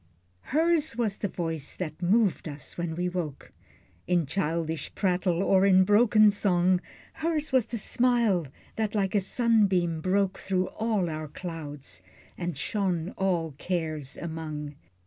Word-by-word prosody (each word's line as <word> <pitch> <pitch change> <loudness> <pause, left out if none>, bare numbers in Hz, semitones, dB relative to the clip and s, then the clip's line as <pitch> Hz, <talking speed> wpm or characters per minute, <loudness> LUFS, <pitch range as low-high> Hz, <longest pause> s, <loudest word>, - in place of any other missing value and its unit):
Hers 315 -2 +2
was 220 -4 -1
the 205 - -1
voice 165 -5 -3
that 160 -2 -5
moved 195 0 +2
us 145 0 -6
when 170 -2 -3
we 180 +1 -1
woke, 175 -6 -5 0.6
In 175 -3 +2
childish 160 0 -2
prattle, 180 -2 +1
or 190 -1 +4
in 190 -1 +6
broken 210 +1 +5
song, 185 -3 +2 0.3
Hers 315 -2 -1
was 260 -4 +3
the 235 - -4
smile, 230 - +2 0.3
that 220 -1 -1
like 195 -2 0
a 205 - +4
sunbeam 195 -6 +2
broke 190 +2 +1
Through 185 -1 -1
all 220 -5 -1
our 155 -1 -4
clouds, 150 - -8 0.3
and 175 -4 -4
shone 185 -1 -1
all 175 -4 -1
cares 155 -6 -3
among. 155 -3 -5
185 Hz, 140 wpm, -27 LUFS, 165-210 Hz, 0.6 s, in